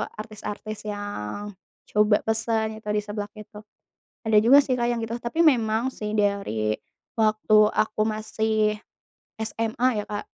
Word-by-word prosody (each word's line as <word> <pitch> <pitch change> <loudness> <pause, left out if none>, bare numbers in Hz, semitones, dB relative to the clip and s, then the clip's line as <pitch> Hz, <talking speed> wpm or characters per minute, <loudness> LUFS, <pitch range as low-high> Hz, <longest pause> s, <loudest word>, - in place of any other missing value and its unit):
artis-artis 215 0 -7
yang 205 - -5 0.4
coba 210 0 +3
pesan 220 0 0
yang - - -25
tadi 210 0 0
seblak 205 0 -5
itu, 210 0 -11 0.6
ada 220 -1 +3
juga 245 +7 +7
sih 260 -2 0
Kak 240 -1 0
yang 235 - -1
gitu. 225 +1 -3
Tapi 235 +6 -5
memang 235 -4 +3
sih, 210 -3 -5
dari 200 - 0 0.4
waktu 215 0 +3
aku 215 0 0
masih 215 0 0 0.6
SMA 225 +1 0
ya - - -10
Kak, 205 0 -4
215 Hz, 140 wpm, -25 LUFS, 210-225 Hz, 0.6 s, juga